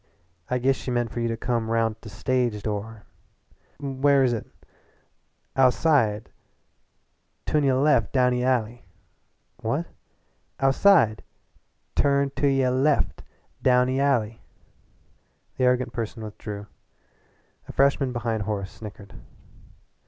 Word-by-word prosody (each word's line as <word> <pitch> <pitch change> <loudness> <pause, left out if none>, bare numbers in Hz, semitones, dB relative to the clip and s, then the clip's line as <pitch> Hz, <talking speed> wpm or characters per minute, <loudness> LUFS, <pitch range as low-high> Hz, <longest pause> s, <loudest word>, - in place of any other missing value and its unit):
"I 125 - +1
giss 130 +2 +1
she - - -6
meant 120 -2 -1
for - - -4
you 115 - 0
to 115 0 -2
come 115 -1 -1
roun' 115 -1 +1
t' 110 - -24
the 110 - -10
stage 120 0 -1
door." 105 0 -4 0.8
"Where 140 -1 -4
where 140 -1 +4
is 125 -2 +2
it?" 115 - -4 1.1
"Ou'side. 125 -5 +2 1.1
Tunayulef. 140 -5 +2
Down 125 -2 +3
ee 125 0 -1
alley." 120 -3 -1 0.7
"What?" - - -2 0.7
"Ou'side. 135 - +4 0.7
Turn 140 -1 +2
to 145 - +2
y' 135 -1 +2
left! 135 +3 +1 0.4
Down 125 0 +4
ee 130 +1 0
alley!" 115 -6 +1 1.2
The 130 - +2
arrogant 125 0 +1
person 115 -1 -5
withdrew. 105 -1 -7 1.0
A - - -7
freshman 140 -1 +2
behind 115 -2 -2
Horace 100 -2 -3
snickered. 100 -2 -11
125 Hz, 120 wpm, -25 LUFS, 110-135 Hz, 1.2 s, where